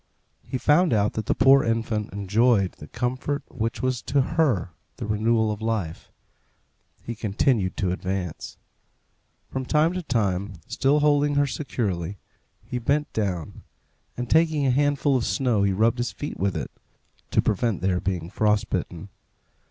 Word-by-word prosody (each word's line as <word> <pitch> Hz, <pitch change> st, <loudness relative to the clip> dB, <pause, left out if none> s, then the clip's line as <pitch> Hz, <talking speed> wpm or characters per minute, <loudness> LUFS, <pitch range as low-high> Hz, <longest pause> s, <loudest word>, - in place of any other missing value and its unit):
He 130 Hz, -, -4 dB
found 155 Hz, +5 st, +3 dB
out 105 Hz, -1 st, +2 dB
that 110 Hz, -2 st, -4 dB
the -, -, +2 dB
poor 135 Hz, +1 st, +6 dB
infant 115 Hz, -2 st, -1 dB
enjoyed 100 Hz, +1 st, +2 dB
the 75 Hz, -, -13 dB
comfort 130 Hz, -, -2 dB
which 115 Hz, 0 st, -3 dB
was 130 Hz, -2 st, 0 dB
to 140 Hz, -, 0 dB
her 130 Hz, -, +1 dB, 0.3 s
the -, -, -5 dB
renewal 110 Hz, +1 st, +1 dB
of 105 Hz, -, -5 dB
life. 110 Hz, -8 st, -3 dB, 0.9 s
He 120 Hz, -, -4 dB
continued 105 Hz, -1 st, 0 dB
to 95 Hz, -3 st, 0 dB
advance. 95 Hz, -2 st, -4 dB, 0.9 s
From 130 Hz, -, -2 dB
time 155 Hz, +5 st, +2 dB
to 185 Hz, -, -3 dB
time, 100 Hz, -, -1 dB
still 145 Hz, +2 st, +2 dB
holding 145 Hz, 0 st, +3 dB
her 145 Hz, 0 st, +4 dB
securely, 100 Hz, -, -3 dB, 0.5 s
he 125 Hz, +3 st, -3 dB
bent 145 Hz, +5 st, 0 dB
down, 95 Hz, -7 st, -3 dB, 0.6 s
and 125 Hz, 0 st, -3 dB
taking 155 Hz, -1 st, +3 dB
a 130 Hz, -, +3 dB
handful 145 Hz, +1 st, +2 dB
of 125 Hz, -, +1 dB
snow 125 Hz, -7 st, +1 dB
he 100 Hz, 0 st, +3 dB
rubbed 110 Hz, +5 st, +2 dB
his 120 Hz, -, -1 dB
feet 145 Hz, -, -6 dB
with 95 Hz, -1 st, 0 dB
it, -, -, -5 dB, 0.6 s
to -, -, +1 dB
prevent 110 Hz, 0 st, +1 dB
their 90 Hz, -1 st, +1 dB
being 90 Hz, -3 st, -3 dB
frost 105 Hz, 0 st, +1 dB
bitten. 90 Hz, +1 st, -3 dB
115 Hz, 155 wpm, -25 LUFS, 100-135 Hz, 0.9 s, poor